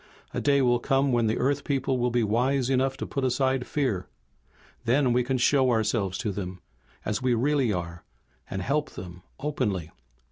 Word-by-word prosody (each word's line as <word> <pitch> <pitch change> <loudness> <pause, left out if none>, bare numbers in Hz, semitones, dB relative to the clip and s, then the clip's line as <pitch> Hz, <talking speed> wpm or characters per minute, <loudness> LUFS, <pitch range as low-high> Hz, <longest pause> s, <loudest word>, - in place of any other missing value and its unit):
A - - -2
day 140 -1 +3
will 120 -1 +3
come 135 +2 +2
when 120 -2 +2
the 110 - 0
Earth 140 +2 +1
people 135 -2 0
will 125 0 +2
be 120 -1 +1
wise 125 +4 +1
enough 130 0 +1
to - - -4
put 140 - -3
aside 130 0 +1
fear. 125 -11 -1 0.8
Then 125 +1 +3
we 125 0 +3
can 130 +1 0
show 130 +1 +3
ourselves 110 -4 +1
to 105 - -2
them 95 -2 -5 0.5
as 105 +4 -1
we 125 -1 +2
really 135 0 +2
are, 85 -3 -4 0.5
and 95 -1 -3
help 150 +5 0
them 90 -1 -9 0.2
openly." 110 - -2
125 Hz, 180 wpm, -27 LUFS, 105-135 Hz, 0.8 s, day